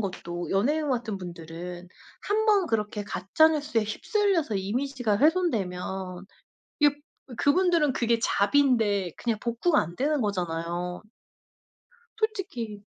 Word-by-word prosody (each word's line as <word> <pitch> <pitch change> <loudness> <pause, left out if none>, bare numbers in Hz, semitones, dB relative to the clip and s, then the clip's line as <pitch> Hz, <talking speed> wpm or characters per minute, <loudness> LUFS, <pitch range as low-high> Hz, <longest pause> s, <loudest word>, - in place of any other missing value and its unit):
것도 175 -3 -4
연예인 290 +10 +1
같은 230 -5 -1
분들은 175 0 -8 0.3
한번 420 -2 +2
그렇게 210 -4 -1
가짜 205 - +3
뉴스에 295 -7 0
휩쓸려서 330 - 0
이미지가 240 +2 -1
훼손되면 190 - 0 0.5
이게 290 -1 +5 0.4
그분들은 330 -2 +3
그게 235 -1 +2
잡인데 205 - +2
그냥 230 -3 -1
복구가 240 +8 +2
안 170 +2 -5
되는 290 +1 +1
거잖아요. 175 -3 -2 1.2
솔직히 360 - -3
225 Hz, 270 characters per minute, -27 LUFS, 190-300 Hz, 1.2 s, 이게